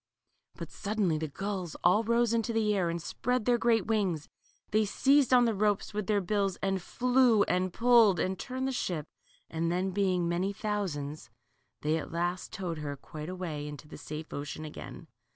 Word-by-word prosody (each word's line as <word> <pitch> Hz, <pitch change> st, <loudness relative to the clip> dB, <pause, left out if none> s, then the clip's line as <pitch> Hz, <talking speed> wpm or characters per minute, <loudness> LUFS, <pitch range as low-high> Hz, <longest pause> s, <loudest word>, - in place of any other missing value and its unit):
But -, -, -8 dB
suddenly 200 Hz, -6 st, -1 dB
the 160 Hz, -, -2 dB
gulls 185 Hz, +1 st, -4 dB
all 185 Hz, +6 st, +5 dB
rose 235 Hz, 0 st, +2 dB
into 230 Hz, 0 st, 0 dB
the 215 Hz, -2 st, +2 dB
air, 185 Hz, -4 st, +1 dB
and 170 Hz, 0 st, -2 dB
spreading 250 Hz, +8 st, -1 dB
their 240 Hz, +1 st, +2 dB
great 225 Hz, -4 st, +3 dB
wings 195 Hz, -9 st, 0 dB, 0.4 s
they 215 Hz, +1 st, +3 dB
seized 275 Hz, +6 st, +3 dB
on 250 Hz, -1 st, +6 dB
the 230 Hz, -, +2 dB
ropes 205 Hz, 0 st, 0 dB
with 210 Hz, -2 st, -3 dB
their 205 Hz, -2 st, +2 dB
bills, 195 Hz, 0 st, 0 dB
and 195 Hz, -1 st, -1 dB
flew, 245 Hz, 0 st, +3 dB
and 185 Hz, 0 st, 0 dB
pulled, 230 Hz, -5 st, +5 dB
and 185 Hz, +3 st, -1 dB
turned 260 Hz, 0 st, -3 dB
the -, -, 0 dB
ship, 175 Hz, -, -2 dB, 0.4 s
and 165 Hz, +1 st, -1 dB
then, 185 Hz, +2 st, 0 dB
being 185 Hz, -3 st, +1 dB
many 180 Hz, +4 st, 0 dB
thousands, 180 Hz, -9 st, -3 dB, 0.5 s
they 155 Hz, +2 st, +1 dB
at -, -, -7 dB
last 175 Hz, +2 st, -2 dB
towed 175 Hz, -4 st, -4 dB
her 145 Hz, -1 st, -4 dB
quite 150 Hz, +3 st, -8 dB
away 165 Hz, -5 st, -4 dB
into 150 Hz, 0 st, -9 dB
the -, -, -10 dB
safe 155 Hz, +2 st, -7 dB
ocean 145 Hz, +2 st, -5 dB
again. 150 Hz, -, -9 dB
190 Hz, 185 wpm, -30 LUFS, 170-220 Hz, 0.5 s, on